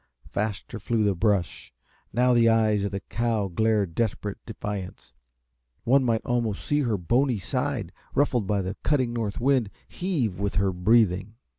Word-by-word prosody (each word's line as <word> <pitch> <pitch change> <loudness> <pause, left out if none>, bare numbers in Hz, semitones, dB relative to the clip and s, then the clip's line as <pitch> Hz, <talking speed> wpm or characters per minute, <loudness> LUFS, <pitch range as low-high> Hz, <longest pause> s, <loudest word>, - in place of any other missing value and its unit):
Faster 105 +2 -3
flew 110 +2 0
the 100 -1 +3
brush. 95 -2 -1 0.4
Now 125 +1 +3
the 115 -1 +5
eyes 110 -2 +3
of 100 - -2
the 100 -1 -4
cow 115 -3 -1
glared 105 -1 +1
desperate 105 0 -2
defiance. 105 -4 -6 0.7
One 135 +3 +4
might 115 -3 0
almost 120 -4 -1
see 145 - +1
her 120 -7 +1
bony 120 - +1
side, 125 -2 -2 0.2
ruffled 125 -7 +2
by 100 -1 +1
the 95 +2 -4
cutting 130 -5 +1
north 110 -4 -2
wind, 130 -4 +2 0.2
heave 135 - -2
with 100 0 -2
her 100 -1 +2
breathing. 100 +1 +2
110 Hz, 155 wpm, -26 LUFS, 100-120 Hz, 0.7 s, the